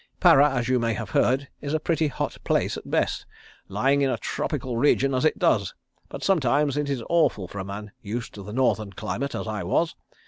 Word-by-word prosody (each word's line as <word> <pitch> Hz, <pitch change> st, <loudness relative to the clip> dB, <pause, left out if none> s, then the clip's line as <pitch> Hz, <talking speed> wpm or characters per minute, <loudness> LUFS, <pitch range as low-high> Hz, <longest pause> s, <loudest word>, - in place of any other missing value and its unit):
Para 145 Hz, +2 st, +7 dB
as 125 Hz, -4 st, -1 dB
you 130 Hz, -1 st, +2 dB
may 115 Hz, -1 st, 0 dB
have 110 Hz, -1 st, -6 dB
heard 135 Hz, +3 st, +2 dB
is 145 Hz, +1 st, -2 dB
a -, -, +1 dB
pretty 160 Hz, -1 st, +1 dB
hot 145 Hz, -, -3 dB
place -, -, +1 dB
at -, -, -9 dB
best, -, -, 0 dB, 0.4 s
lying 135 Hz, +8 st, +2 dB
in 135 Hz, -, +2 dB
a -, -, 0 dB
tropical 130 Hz, -4 st, -3 dB
region 135 Hz, +2 st, +3 dB
as 130 Hz, +4 st, +1 dB
it 155 Hz, -, +2 dB
does, -, -, +1 dB, 0.3 s
but -, -, -7 dB
sometimes 145 Hz, -5 st, +2 dB
it 145 Hz, -1 st, -1 dB
is 130 Hz, -4 st, -2 dB
awful 160 Hz, -, +2 dB
for 100 Hz, -, -7 dB
a -, -, -3 dB
man 100 Hz, +2 st, -7 dB
used 115 Hz, +3 st, -5 dB
to 100 Hz, -, -9 dB
the 100 Hz, +2 st, -8 dB
Northern 110 Hz, -4 st, 0 dB
climate, 140 Hz, +7 st, -3 dB
as -, -, -4 dB
I 105 Hz, -1 st, -3 dB
was. 160 Hz, -, +1 dB
130 Hz, 215 wpm, -25 LUFS, 110-145 Hz, 0.4 s, Para